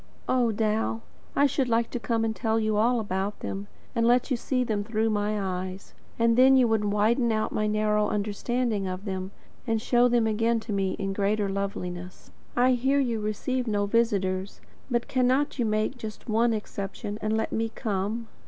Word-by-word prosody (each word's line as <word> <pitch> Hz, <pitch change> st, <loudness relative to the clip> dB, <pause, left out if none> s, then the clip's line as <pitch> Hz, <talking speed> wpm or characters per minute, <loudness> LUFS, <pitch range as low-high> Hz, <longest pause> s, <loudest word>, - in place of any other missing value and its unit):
Oh, 245 Hz, -3 st, +2 dB
Dal! 220 Hz, +1 st, 0 dB, 0.3 s
I 285 Hz, -, +5 dB
should 270 Hz, -2 st, +1 dB
like 230 Hz, 0 st, +1 dB
to 245 Hz, -, -2 dB
come 230 Hz, -1 st, 0 dB
and 220 Hz, 0 st, -1 dB
tell 225 Hz, -1 st, 0 dB
you 215 Hz, -1 st, 0 dB
all 235 Hz, +3 st, +3 dB
about 200 Hz, -1 st, -3 dB
them, 200 Hz, +1 st, -4 dB, 0.3 s
and 230 Hz, -1 st, +2 dB
let 245 Hz, +3 st, +3 dB
you -, -, +4 dB
see 255 Hz, +2 st, 0 dB
them 215 Hz, -4 st, -1 dB
through 220 Hz, +1 st, 0 dB
my 210 Hz, 0 st, 0 dB
eyes; 185 Hz, 0 st, -4 dB, 0.2 s
and 230 Hz, 0 st, +3 dB
then 265 Hz, +2 st, +7 dB
you 250 Hz, -2 st, +5 dB
would 220 Hz, -2 st, +1 dB
widen 220 Hz, +4 st, +2 dB
out 215 Hz, 0 st, 0 dB
my 215 Hz, -, 0 dB
narrow 210 Hz, 0 st, +2 dB
understanding 210 Hz, +1 st, -1 dB
of 185 Hz, +2 st, -5 dB
them, 190 Hz, -1 st, -3 dB, 0.4 s
and 225 Hz, -1 st, +1 dB
show 240 Hz, +2 st, +3 dB
them 240 Hz, -2 st, +3 dB
again 225 Hz, +1 st, +1 dB
to 220 Hz, -1 st, -5 dB
me 195 Hz, -1 st, 0 dB
in 195 Hz, -1 st, -3 dB
greater 205 Hz, +1 st, 0 dB
loveliness. 180 Hz, -2 st, -5 dB, 0.2 s
I 250 Hz, +1 st, +4 dB
hear 265 Hz, +3 st, +2 dB
you 240 Hz, -5 st, 0 dB
receive 245 Hz, +4 st, -2 dB
no 205 Hz, -2 st, +1 dB
visitors; 200 Hz, -4 st, 0 dB, 0.3 s
but 240 Hz, -2 st, 0 dB
cannot 260 Hz, +2 st, +1 dB
you 240 Hz, -, +2 dB
make 215 Hz, +4 st, 0 dB
just 220 Hz, +1 st, -8 dB
one 230 Hz, +1 st, +3 dB
exception, 210 Hz, 0 st, -4 dB
and 215 Hz, +1 st, 0 dB
let 220 Hz, -, -1 dB
me 225 Hz, 0 st, -1 dB
come? 215 Hz, +2 st, -3 dB
220 Hz, 190 wpm, -27 LUFS, 205-235 Hz, 0.4 s, then